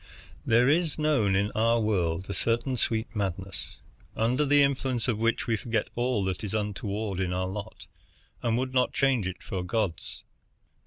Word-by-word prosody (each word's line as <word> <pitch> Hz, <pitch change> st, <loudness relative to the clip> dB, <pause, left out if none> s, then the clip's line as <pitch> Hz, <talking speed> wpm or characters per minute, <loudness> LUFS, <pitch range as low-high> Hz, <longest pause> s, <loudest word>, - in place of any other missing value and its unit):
There 120 Hz, +3 st, +4 dB
is 160 Hz, +1 st, +2 dB
known 145 Hz, -11 st, +2 dB
in 100 Hz, +2 st, +1 dB
our 115 Hz, +1 st, +2 dB
world 95 Hz, -5 st, 0 dB
a 100 Hz, -, -3 dB
certain 120 Hz, +5 st, +1 dB
sweet 115 Hz, -1 st, -1 dB
madness, 95 Hz, -4 st, -4 dB, 0.4 s
under 125 Hz, +6 st, +1 dB
the 145 Hz, 0 st, +6 dB
influence 135 Hz, -3 st, 0 dB
of 115 Hz, -4 st, 0 dB
which 115 Hz, +1 st, +1 dB
we 115 Hz, -, +1 dB
forget 115 Hz, 0 st, -2 dB
all 120 Hz, -3 st, 0 dB
that 95 Hz, +2 st, -2 dB
is 105 Hz, 0 st, -3 dB
untoward 105 Hz, -1 st, -2 dB
in 90 Hz, -2 st, 0 dB
our 90 Hz, 0 st, -1 dB
lot, 100 Hz, +3 st, -7 dB, 0.6 s
and 115 Hz, -1 st, +1 dB
would 130 Hz, +1 st, -2 dB
not 125 Hz, -1 st, +2 dB
change 130 Hz, -8 st, +2 dB
it 95 Hz, -, -6 dB
for 95 Hz, -, -4 dB
a -, -, -3 dB
god's. 95 Hz, -2 st, -3 dB
110 Hz, 175 wpm, -28 LUFS, 95-125 Hz, 0.6 s, the